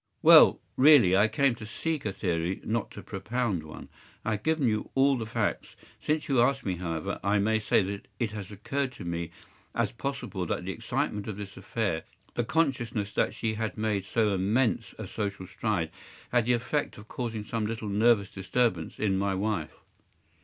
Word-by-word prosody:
” - - -46
“Well, - - +8 0.2
really, 130 -10 +7
I 105 +3 +5
came 135 +4 +2
to 110 -2 -9
seek 155 +7 -3
a 105 - 0
theory, 90 -2 -1
not 110 0 -1
to - - -10
propound 115 -7 -2
one. 75 0 -10 0.4
I 110 - 0
have 105 -1 -1
given 160 -2 +1
you 110 -1 0
all 135 +1 +5
the 115 -3 -4
facts. 115 -2 -2 0.3
Since 155 0 0
you 135 -4 +3
ask 135 +3 +2
me, 95 -3 -1
however, 85 -3 -3
I 100 +2 +3
may 110 +2 +2
say 105 - +3
that 100 +1 -5
it 115 -4 -1
has 105 -3 -6
occurred 130 +6 -2
to 90 - -9
me 85 -1 -3 0.5
as - - +1
possible 120 -9 -4
that 90 - -2
the 95 - -2
excitement 105 +2 -2
of 105 -2 -4
this 100 -2 -7
affair, 100 -3 -2 0.3
the 120 - 0
consciousness 120 -8 0
that - - 0
she 110 -1 -1
had 110 -2 -3
made 105 -3 0
so 105 0 +1
immense 110 +6 +1
a - - -5
social 100 -3 -4
stride, 90 -3 -2 0.4
had 120 -2 +3
the 125 - +4
effect 125 +5 -1
of 105 +1 -12
causing 115 -4 -4
some 110 0 -2
little 110 -1 -4
nervous 105 0 +3
disturbance 95 -2 0
in 95 -3 +1
my 100 -1 0
wife. 100 -5 -2
110 Hz, 190 wpm, -28 LUFS, 95-120 Hz, 0.5 s, Well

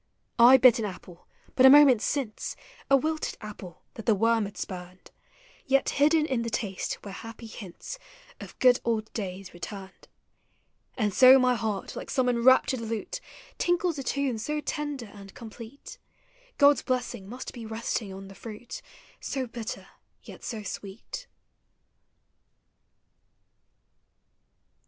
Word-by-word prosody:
I 245 +3 +9
bit 255 -2 +6
an 220 - -1
apple 180 -3 -10 0.3
but 255 - +3
a 265 - +10
moment 275 -5 +7
since, 265 -6 -3 0.2
— - - -24
A 275 - +7
wilted 310 +3 -2
apple 205 -5 -10
that 225 - -10
the 220 - +5
worm 225 +1 +2
had 200 - -9
spurned, 180 -1 -8 0.3
— - - -27
Yet 270 0 +3
hidden 305 +2 +3
in 260 -6 -1
the 230 - -3
taste 205 -4 -3
were 200 - -6
happy 225 +3 -9
hiuts 215 - -9 0.4
Of - - -11
good 250 -1 +5
old 225 -2 -2
days 195 -3 -6
returned. 190 +2 -9 0.9
And 210 -5 0
so 260 +4 +8
my 255 -1 +3
heart, 220 -4 -3
like - - -7
some 260 -1 +1
enraptured 250 +1 +4
lute, 225 -1 -4 0.4
Tinkles 350 -3 +1
a - - -4
tune 265 -3 -1
so 300 +7 -2
tender 295 -4 -4
and 200 -1 -13
complete, 235 - -11 0.6
God's 285 0 +5
blessing 245 -6 -3
must 250 +3 -7
be 230 -3 -8
resting 220 -2 -3
on 195 +1 -9
the 195 - -11
fruit 220 +4 -9 0.4
So 265 -2 -3
bitter, 235 -1 -6 0.4
yet - - -12
so 220 -3 -5
sweet 205 - -7
230 Hz, 140 wpm, -27 LUFS, 210-265 Hz, 0.9 s, a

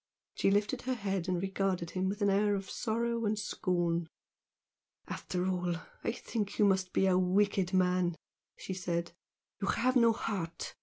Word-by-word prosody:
She - - +2
lifted 205 +5 +1
her 255 0 -1
head 195 -5 -2
and 180 -1 +1
regarded 190 -2 -1
him 185 0 0
with 205 +1 -2
an 200 - +4
air 205 +1 +3
of 195 -1 -5
sorrow 235 +1 -1
and 215 0 +1
scorn. 175 -5 0 1.0
"After 180 0 -3
all, 180 -2 0 0.3
I - - +1
think 220 -3 -4
you 210 - +5
must 190 -2 +2
be 195 - +2
a 185 -1 +4
wicked 190 0 +2
man!" 180 -2 +2 0.4
she 190 - -5
said 175 -2 -2 0.5
"You 195 - -1
have 255 +6 +2
no 235 -2 +6
heart! 185 -7 -3
195 Hz, 165 wpm, -32 LUFS, 180-210 Hz, 1.0 s, no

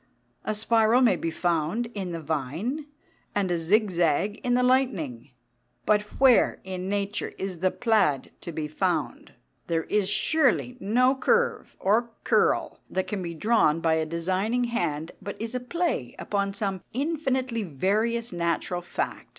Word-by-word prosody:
A 215 - -2
spiral 225 +2 +3
may 235 -7 +5
be 165 - -2
found 170 +6 0
in 190 -3 -4
the 165 - -4
vine, 165 - -3 0.5
and 195 -3 +1
a 175 - +1
zig 205 +5 +2
zag 175 +4 +1
in 245 -1 +2
the 250 - +3
lightning, 195 - +1 0.6
but 210 -1 +4 0.2
where 260 -3 +5
in 185 0 -5
nature 200 0 -2
is 190 -3 -4
the 185 +2 +3
plaid 210 - +1
to 170 - -6
be 155 -1 -3
found? 150 - -2 0.3
There 165 -1 0
is 205 +1 0
surely 250 +3 +2
no 250 +6 +3
curve 475 - +1
or 225 +5 +2
curl - - +2
that 190 - -1
can 205 -2 -3
be 170 -2 -5
drawn 210 -5 +3
by 165 -1 +2
a 160 0 +1
designing 185 +9 0
hand 165 -10 -2
but 200 - -7
is 225 +2 -4
a 250 - -1
play 250 - -2
upon 200 -1 -2
some 195 -3 -2
infinitely 265 -4 -1
various 210 - -1
natural 175 +1 -1
fact. 175 - -4
200 Hz, 155 wpm, -26 LUFS, 170-235 Hz, 0.6 s, may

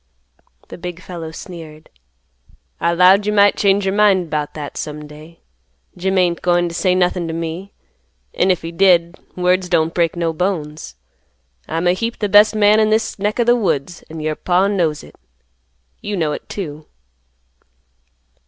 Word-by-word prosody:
The - - -10
big 180 -1 -6
fellow 170 -3 -8
sneered. 160 -2 -11 0.9
"I 170 - +1
'lowed 185 +4 +5
you - - +2
might 205 -1 +4
change 200 0 +2
your 190 - 0
mind 195 -5 +3
'bout 150 -1 -3
that 145 -2 -7
some 150 0 -6
day. 155 +3 -14 0.5
Jim 190 +2 -1
ain't 175 -2 +1
goin' 175 -1 +2
t' 170 - -7
say 180 +1 +1
nothin' 180 -1 0
t' 160 - -4
me, 165 +4 -5 0.6
an' 185 - +1
if 180 -3 +1
he 165 - -5
did, 170 -1 +3 0.2
words 180 0 +1
don't 165 -1 +1
break 170 -1 0
no 170 -1 -1
bones. 155 - -3 0.7
I'm 165 +2 -2
a 175 - +4
heap 230 +5 -3
th' 210 -2 -2
best 210 +1 +6
man 210 0 +4
in 215 0 +3
this 220 -1 0
neck 210 +4 -1
o' - - +4
th' 240 +1 +4
woods, 175 - -2
an' 160 0 -8
your 155 0 -2
Paw 180 +4 +1
knows 175 -7 0
hit. - - -15 0.9
You 205 -1 -4
know 160 -3 0
it, - - -7
too." 155 -6 -7
180 Hz, 170 wpm, -18 LUFS, 165-195 Hz, 0.9 s, best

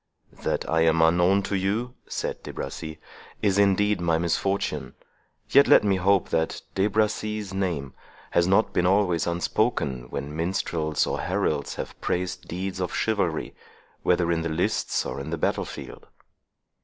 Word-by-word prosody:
"That - - -1
I 80 0 +2
am 80 0 +4
unknown 90 +4 +4
to 100 - -2
you," 105 +6 -1
said - - -3
De - - -7
Bracy, 80 0 -6 0.5
"is 100 -1 +3
indeed 100 0 +3
my 85 -2 +2
misfortune; 95 +4 -1 0.6
yet 140 - +7
let - - +7
me 100 -2 +2
hope 95 +1 +2
that 80 0 -1
De 95 +1 +2
Bracy's 105 -1 -1
name 85 -9 -2 0.4
has 85 0 +3
not 100 +4 +3
been 90 - +2
always 95 -4 +2
unspoken, 70 -7 0
when 70 +2 -5
minstrels 80 -2 0
or - - -2
heralds - - -1
have - - -7
praised 90 0 -2
deeds 95 +2 -4
of 90 -2 -2
chivalry, 100 -8 0 0.5
whether 85 -1 +2
in 85 -1 +1
the 85 - -2
lists 80 +3 0
or 65 - -4
in 70 - -6
the - - -2
battle - - 0
field." - - -9
90 Hz, 155 wpm, -25 LUFS, 80-100 Hz, 0.6 s, yet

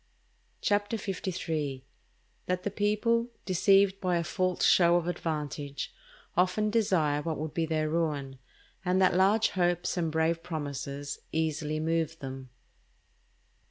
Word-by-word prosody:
CHAPTER 205 +2 +1
LIII.—_That 175 -2 -5
the 205 - -2
People, 220 +3 +1 0.2
deceived 195 +1 +4
by 180 -2 +1
a 170 - 0
false 185 +2 -1
show 175 -1 +6
of 175 -1 +1
Advantage, 150 -4 -3 0.4
often 185 +4 +2
desire 180 -10 +2
what 160 0 -3
would 155 0 -4
be 165 -1 0
their 155 -1 0
Ruin; 150 -5 -1 0.4
and 185 0 +2
that 185 -1 +4
large 200 +4 +4
Hopes 175 0 0
and 165 -2 0
brave 160 +1 +1
Promises 145 -3 -5
easily 155 -1 -1
move 165 0 0
them_. 135 -2 -7
170 Hz, 125 wpm, -29 LUFS, 155-190 Hz, 0.4 s, show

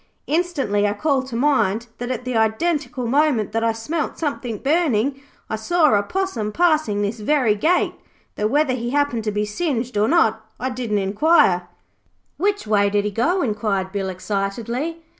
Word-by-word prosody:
Instantly 290 - 0
I 205 - 0
call 275 +4 +1
to 260 -2 -8
mind 230 -5 +2
that 245 0 -4
at 250 -1 -3
the 250 -1 -2
identical 250 +3 0
moment 255 -4 +2
that 225 +1 -1
I 230 - +3
smelt 295 +8 -3
something 260 -7 -3
burning, 275 - +1 0.3
I 220 - -3
saw 310 +5 +3
a 205 - +4
possum 235 - -2
passing 305 -9 +2
this 210 +3 -3
very 245 -1 +2
gate, 320 - +1 0.4
though 210 - -1
whether 290 +2 +2
he 240 -1 -3
happened 280 -4 0
to 215 - 0
be 210 +1 -1
singed 245 +1 -2
or 210 +1 +3
not 225 -9 +2 0.2
I 260 +3 -2
didn't 240 -4 -2
inquire.' 195 - +3 0.7
'Which 410 +1 0
way 205 -1 +3
did 205 0 0
he 210 - -1
go?' 330 - +1
inquired 210 -4 -1
Bill 195 -1 -2
excitedly. 225 - -3
235 Hz, 170 wpm, -21 LUFS, 210-295 Hz, 0.7 s, a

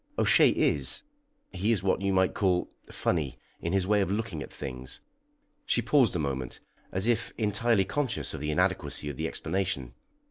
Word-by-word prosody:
"O'Shea - - +6
is - - +1 0.5
he 100 +4 0
is 100 -5 +1
what 95 0 +1
you 100 0 +1
might 95 -1 +3
call 90 -3 +1 0.2
funny 70 -8 -1 0.2
in 85 - -2
his 95 -1 +2
way 105 +1 +3
of 95 - 0
looking 105 -6 -2
at - - -7
things." 65 -2 -6 0.6
She 120 - +1
paused 120 -3 +3
a - - +2
moment, 70 -5 -3 0.3
as 95 +2 0
if 120 -1 +1
entirely 105 -1 +2
conscious 130 +4 -1
of 80 - -5
the 75 - -2
inadequacy 75 0 0
of 65 - -11
the - - -1
explanation. 95 +3 -2
95 Hz, 175 wpm, -28 LUFS, 80-105 Hz, 0.6 s, O'Shea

